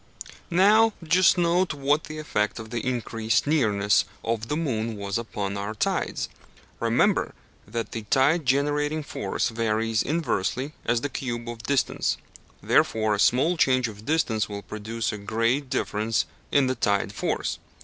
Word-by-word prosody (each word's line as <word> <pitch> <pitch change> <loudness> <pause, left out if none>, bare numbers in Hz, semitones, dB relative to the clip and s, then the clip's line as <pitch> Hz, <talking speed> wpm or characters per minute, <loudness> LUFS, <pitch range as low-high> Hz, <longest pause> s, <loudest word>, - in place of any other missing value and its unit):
Now 210 +5 +5
just 180 +3 +4
note 175 -1 +2
what 145 +2 +1
the 155 0 -7
effect 105 -9 -1
of 110 -1 -8
the 120 -2 -2
increased 115 -2 0
nearness 105 -9 +3 0.2
of 115 -1 -1
the 150 - -1
moon 115 -8 -2
was 100 +2 -2
upon 100 -3 -4
our 100 +2 -4
tides. - - -1 0.5
Remember - - +2 0.3
that 115 +2 -4
the 115 - -4
tide 135 +9 +2
generating 145 +3 +1
force 100 -4 -2
varies 115 -1 0
inversely 145 - -1
as 120 0 +1
the 145 - -2
cube 120 -3 -4
of 120 -1 -6
distance, 135 +3 0 0.5
wherefore 110 -1 +2
a 105 - -1
small 155 - +3
change 130 -4 +3
of 105 -1 -10
distance 125 -10 +1
will 100 -1 -6
produce 110 +2 -3
a 105 - -6
great 115 +7 0
difference 110 -4 0 0.3
in 140 -2 +4
the 130 - +1
tide 100 -4 0
force. - - -2
120 Hz, 150 wpm, -25 LUFS, 110-145 Hz, 0.5 s, Now